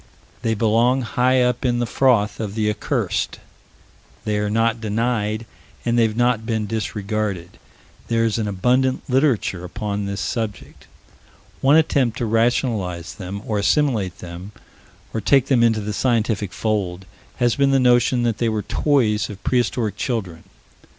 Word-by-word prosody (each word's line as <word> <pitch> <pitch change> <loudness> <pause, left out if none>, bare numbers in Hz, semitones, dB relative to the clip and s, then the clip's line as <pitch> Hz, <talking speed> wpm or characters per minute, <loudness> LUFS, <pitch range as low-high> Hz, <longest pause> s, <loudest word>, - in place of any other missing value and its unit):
They 115 -1 0
belong 115 +4 +2
high 125 +2 +2
up 125 0 0
in 120 -2 +1
the 120 - 0
froth 115 -4 +2
of 105 -2 -4
the 105 -1 +1
accursed: - - -2 0.9
they 105 -1 0
are 105 0 -1
not 115 +1 +1
denied, 110 0 -1 0.4
and 120 - +1
they 120 - +4
have 110 -1 +1
not 120 -2 +2
been 110 -2 -1
disregarded; 105 -4 -3 0.5
there 115 0 +1
is 115 0 0
an 110 - -1
abundant 125 +6 +1
literature 125 - +1
upon 100 +2 -4
this 100 0 -4
subject. 110 -6 -4 0.7
One 140 +3 +5
attempt 140 -7 +2
to 120 - -1
rationalize 110 -6 0
them, 100 0 -7
or 105 -2 -1
assimilate 110 - +1
them, 90 +4 -9 0.6
or 110 - -2
take 135 +5 +4
them 130 -4 +4
into 115 -2 +3
the 105 +1 -4
scientific 110 -4 0
fold, 95 -4 -2 0.3
has 120 -2 +1
been 140 -1 +3
the 135 0 +3
notion 125 0 +3
that 115 -2 0
they 115 - +1
were 110 -2 -2
toys 120 -8 +1
of 105 -1 -10
prehistoric 120 -4 0
children. 95 -9 -3
110 Hz, 155 wpm, -21 LUFS, 105-120 Hz, 0.9 s, One